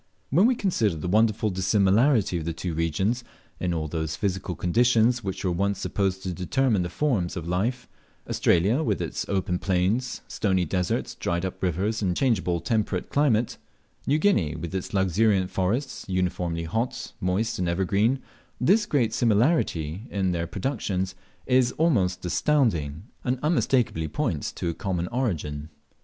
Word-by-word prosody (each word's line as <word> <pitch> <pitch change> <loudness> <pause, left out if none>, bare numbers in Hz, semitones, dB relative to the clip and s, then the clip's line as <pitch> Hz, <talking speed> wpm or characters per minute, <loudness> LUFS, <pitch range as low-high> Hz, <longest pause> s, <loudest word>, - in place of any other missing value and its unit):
When 180 - +5
we 255 - +3
consider 120 - +1
the 80 +3 -4
wonderful 110 +2 +2
dissimilarity 100 +3 +3
of 80 - -6
the 85 - -2
two 85 +1 -4
regions 95 +10 0 0.4
in 90 - -1
all 80 -2 -2
those 80 0 -3
physical 95 0 -2
conditions 120 +6 +3
which 95 0 -4
were 90 - +2
once 100 +3 0
supposed 95 -1 -1
to 95 -2 -3
determine 110 - +1
the 90 - -2
forms 95 - 0
of 85 -1 -5
life 115 +9 -1 0.4
Australia, 100 - +2
with 155 - 0
its - - -4
open 90 -2 0
plains, 100 +7 0
stony 95 -4 0
deserts, 90 +2 -1
dried 85 +1 -2
up 95 - -5
rivers, 95 +5 0
and 90 -3 0
changeable 95 -9 +1
temperate 105 -5 -1
climate; 125 -6 +2 0.5
New 145 - +3
Guinea, 105 - +2
with 85 +1 -6
its 95 -2 -3
luxuriant 95 0 +2
forests, 115 +9 -1
uniformly 90 -2 -1
hot, 110 +9 -3
moist, 95 +5 0
and 90 -2 0
evergreen 100 +8 +1 0.4
this 205 - +3
great 120 - +1
similarity 110 - +1
in 95 -2 0
their 85 -1 -2
productions 95 -5 -2 0.3
is 125 -1 +3
almost 95 - +1
astounding, 90 - +1 0.2
and 125 +1 0
unmistakeably 130 - +1
points - - -2
to - - -4
a 85 - 0
common 90 -3 -2
origin. 80 - -2
95 Hz, 150 wpm, -26 LUFS, 90-120 Hz, 0.5 s, When